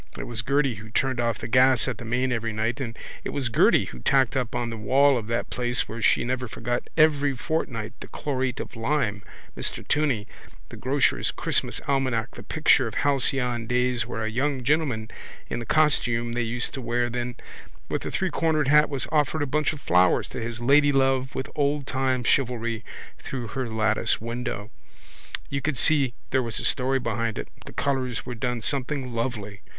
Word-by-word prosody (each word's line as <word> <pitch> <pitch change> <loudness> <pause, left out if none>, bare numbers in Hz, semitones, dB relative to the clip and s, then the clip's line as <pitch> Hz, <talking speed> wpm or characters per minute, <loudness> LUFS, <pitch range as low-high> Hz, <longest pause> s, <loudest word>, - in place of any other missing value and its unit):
It - - -4
was 115 -3 -4
Gerty 135 0 +1
who 110 +2 -10
turned 130 +3 0
off 115 -2 +1
the - - -6
gas 130 +1 +5
at 130 - -3
the 120 - -7
main 125 +3 0
every 115 -1 -1
night 110 +5 -1
and 120 -3 -5 0.3
it - - -4
was 135 -4 -2
Gerty 110 - +4
who 60 - -10
tacked 130 - +2
up 125 -2 -1
on 120 -1 -1
the - - -4
wall 135 +6 +4
of 115 -4 -3
that 115 +1 -2
place 125 -1 0
where 115 +1 -6
she - - +3
never 125 +1 -2
forgot 120 +2 -3
every 145 -3 +4
fortnight 125 -6 -3
the - - -9
chlorate 130 -3 -2
of - - -6
lime 115 -4 0 0.3
Mr - - -4
Tunney 145 -8 +1 0.4
the - - -9
grocer's 135 +2 +1
christmas - - -1
almanac, 130 -4 0
the - - -10
picture 155 -4 +3
of 110 - -7
halcyon 125 -4 +2
days 125 -2 +1
where 110 -2 -4
a - - -1
young 130 +2 -1
gentleman 135 -6 0 0.4
in - - -1
the 120 - -7
costume 120 -6 +2
they 120 - 0
used 120 +1 -2
to 135 - -5
wear 120 0 0
then 120 0 -3 0.5
with - - -2
a - - -3
threecornered 160 -5 0
hat 150 +1 +6
was 140 -4 -2
offering 150 0 +1
a - - 0
bunch 150 +2 +1
of 150 - -7
flowers 90 -8 +3
to - - -6
his 115 0 -4
ladylove 135 0 +3
with 130 - -3
oldtime 135 -3 0
chivalry 115 -3 0 0.4
through 125 -3 -5
her 130 0 -3
lattice 110 0 +1
window. 115 -2 -4 0.8
You 140 0 -1
could 155 -3 -1
see 135 -2 +3 0.2
there 130 - +3
was 115 -3 -2
a - - -2
story 135 0 +2
behind 115 -3 -2
it. - - -5 0.2
The - - -9
colours 130 -3 -1
were 125 - -4
done 120 -1 -2
something 135 -1 0
lovely. 110 -4 -3
125 Hz, 190 wpm, -25 LUFS, 115-140 Hz, 0.8 s, hat